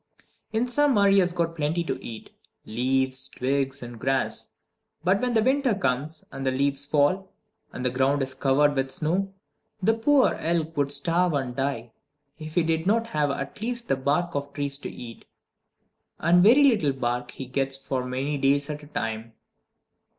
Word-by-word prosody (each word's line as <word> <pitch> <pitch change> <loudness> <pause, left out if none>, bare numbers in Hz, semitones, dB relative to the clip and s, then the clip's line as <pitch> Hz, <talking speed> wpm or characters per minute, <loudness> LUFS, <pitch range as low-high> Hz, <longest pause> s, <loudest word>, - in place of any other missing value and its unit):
In 225 +3 0
summer 245 -6 +4
he 195 0 +5
has 180 -2 +2
plenty 165 -1 -1
to - - -4
eat 110 -2 -9 0.3
leaves, 130 +3 0
twigs, 135 +1 -2
and 120 -1 -9
grass. 135 +1 -1 0.5
But 185 +3 +2
when 250 -1 0
the 220 - +4
winter 260 -2 +2
comes, 150 -3 -2
and 135 - -6
the 135 - +2
leaves 140 +1 0
fall, 170 +7 +1 0.4
and 125 - -6
the 125 - +2
ground 135 +2 +1
is 130 0 -4
covered 140 +2 +3
with 135 -1 -1
snow, 180 +8 -1 0.5
the 210 +3 +3
poor 260 +5 +3
elk 165 -1 -1
would 140 -1 0
starve 170 +5 +1
and 130 -3 -2
die, 135 -4 -2 0.5
if 155 0 -8
he 175 - +3
did 160 +1 0
not 225 +3 +2
have 150 -9 0
at 140 +6 -5
least 235 +1 -4
the - - +3
bark 145 +6 0
of 140 0 -3
trees 140 -1 -3
to - - -6
eat. 115 -2 -10 0.9
And 175 +2 +4
very 240 +9 +7
little 210 - +3
bark 125 -1 -2
he 135 - -7
gets 135 +1 -1
for 135 -1 -3
many 135 +3 -2
days 140 +2 +2
at 150 0 -6
a 145 - -13
time. 115 -4 -4
145 Hz, 175 wpm, -25 LUFS, 135-180 Hz, 0.9 s, very